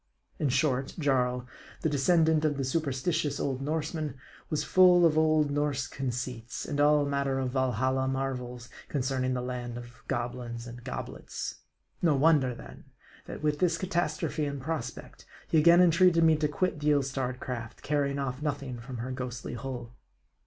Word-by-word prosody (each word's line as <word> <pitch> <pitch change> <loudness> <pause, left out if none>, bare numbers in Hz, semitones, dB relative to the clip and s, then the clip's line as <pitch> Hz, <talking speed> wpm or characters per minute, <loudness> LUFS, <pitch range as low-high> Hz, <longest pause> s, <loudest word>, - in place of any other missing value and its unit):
In 145 - +1
short, 135 -1 +1
Jarl, 125 -5 +1 0.4
the 160 - +1
descendant 160 +2 +3
of 150 -2 +1
the 135 - -1
superstitious 145 +2 -1
old 135 -1 -1
Norsemen, 155 -1 -2 0.3
was 155 - 0
full 180 -1 +6
of 160 -2 +4
old 155 -2 +3
Norse 145 -2 0
conceits, 125 -2 -4
and 145 0 -1
all 145 0 +5
manner 140 -1 0
of 130 -1 -1
Valhalla 130 0 +1
marvels 125 -2 -3 0.2
concerning 130 -2 0
the 125 - -2
land 125 -1 -4
of 120 +1 -11
goblins 120 -1 -3
and 120 0 -9
goblets. - - -6 0.4
No 165 -4 +4
wonder 135 -4 +4
then, - - -12 0.4
that - - -7
with 150 -1 +1
this 170 -2 +2
catastrophe 170 -4 -1
in 140 -1 -4
prospect, 135 -3 -5 0.2
he 160 - +3
again 170 +3 +7
entreated 175 -1 +5
me 160 -1 +6
to 150 0 +1
quit 180 +1 -1
the 150 0 +1
ill 140 -1 +3
starred 130 -1 -3
craft, 120 -4 -6
carrying 140 -1 0
off 135 -1 -3
nothing 140 -4 -3
from 125 +2 -7
her 120 +3 -4
ghostly 125 -2 -5
hull. 120 -1 -6
135 Hz, 160 wpm, -29 LUFS, 125-155 Hz, 0.4 s, again